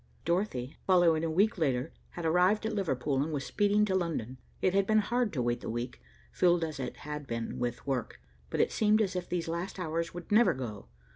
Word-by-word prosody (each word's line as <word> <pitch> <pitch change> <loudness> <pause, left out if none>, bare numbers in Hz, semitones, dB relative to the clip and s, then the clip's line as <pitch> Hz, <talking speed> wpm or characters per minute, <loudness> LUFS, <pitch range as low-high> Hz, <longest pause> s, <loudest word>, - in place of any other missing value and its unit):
Dorothy, 170 -8 -1
following 175 -4 +4
a 165 - 0
week 200 +6 +2
later, 130 -5 0 0.2
had 175 - -5
arrived 180 +6 +3
at 220 - -1
Liverpool 140 -8 0
and 155 +3 -1
was 140 -3 -2
speeding 205 0 +2
to 195 - -1
London. 155 -9 -2 0.2
It 185 - +2
had 195 0 +2
been 215 - +4
hard 235 +1 +1
to 130 -5 0
wait 120 0 0
the - - -5
week, 120 - -4 0.3
filled 175 - +3
as 155 -3 -4
it 130 - -4
had 150 -1 -6
been 115 -1 -4
with 120 -1 -3
work, 130 -4 -2 0.3
but - - -3
it - - +3
seemed 215 0 +3
as 200 -3 0
if 180 -1 -3
these 175 -2 -2
last 170 +4 -3
hours 165 -1 -2
would 175 +2 -9
never 210 - +5
go. 110 - -6
170 Hz, 215 wpm, -30 LUFS, 130-195 Hz, 0.3 s, never